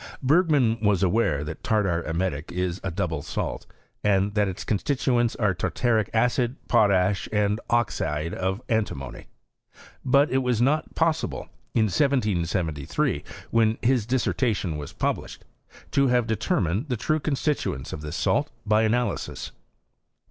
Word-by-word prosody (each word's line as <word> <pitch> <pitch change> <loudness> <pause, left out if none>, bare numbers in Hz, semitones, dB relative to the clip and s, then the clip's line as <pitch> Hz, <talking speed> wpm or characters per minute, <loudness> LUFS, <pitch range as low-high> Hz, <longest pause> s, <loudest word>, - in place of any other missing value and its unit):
Bergman 140 -6 +3
was 105 -3 +2
aware 90 -7 +2
that 75 +1 -7
tartar 95 -6 +1
emetic 80 -1 -2
is 90 0 -2
a 95 - -1
double 85 -4 -2
salt, - - -4 0.4
and 100 0 +2
that 105 -1 +2
its 95 0 -5
constituents 120 +1 +1
are 105 -4 +1
tartaric 110 +3 0
acid, 120 +2 +1
potash, 100 -4 +3
and 105 +1 +1
oxide 85 -9 0
of 95 +5 -2
antimony; 105 - -2 0.8
but 140 +3 +3
it 130 - +3
was 125 -3 0
not 145 +6 +1
possible, 160 -1 0 0.3
in 115 - +4
1773, 90 - 0 0.3
when 115 -1 +3
his 120 -3 +2
dtsaertation 115 - 0
was 75 -1 -6
published, - - -3 0.5
to 140 -1 +3
have 125 -2 +2
determined 110 - 0
the 125 - 0
true 155 +8 0
constitu 150 - -1
ents 65 - -8
of 75 - -6
this 75 0 -5
salt - - +1 0.2
by 105 +1 +3
analysis, 120 +2 -1
7. - - -34
110 Hz, 140 wpm, -25 LUFS, 90-125 Hz, 0.8 s, in